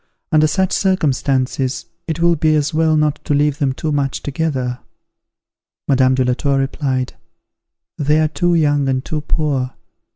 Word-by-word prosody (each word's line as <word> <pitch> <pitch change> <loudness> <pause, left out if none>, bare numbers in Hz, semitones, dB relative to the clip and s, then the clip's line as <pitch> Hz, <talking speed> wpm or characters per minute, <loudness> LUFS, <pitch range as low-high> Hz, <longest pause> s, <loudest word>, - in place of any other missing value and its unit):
Under 155 -1 +4
such 190 +4 0
circumstances, 135 -7 0 0.2
it 160 -1 -3
will 170 0 +3
be 155 0 +2
as 150 0 0
well 160 0 +2
not 150 -1 0
to 145 - 0
leave 145 +1 +1
them 140 -3 +1
too 155 +4 -3
much 140 -2 -1
together." 130 -4 -2 1.1
Madame 130 -1 +3
de 130 -1 +1
la 125 - +2
Tour 140 +2 0
replied, 135 -1 -1 0.9
"They 150 +1 +2
are 155 - +3
too 175 +3 0
young 145 -3 +2
and 130 0 -1
too 155 -1 -3
poor. 140 -5 -1
145 Hz, 160 wpm, -18 LUFS, 135-155 Hz, 1.1 s, Under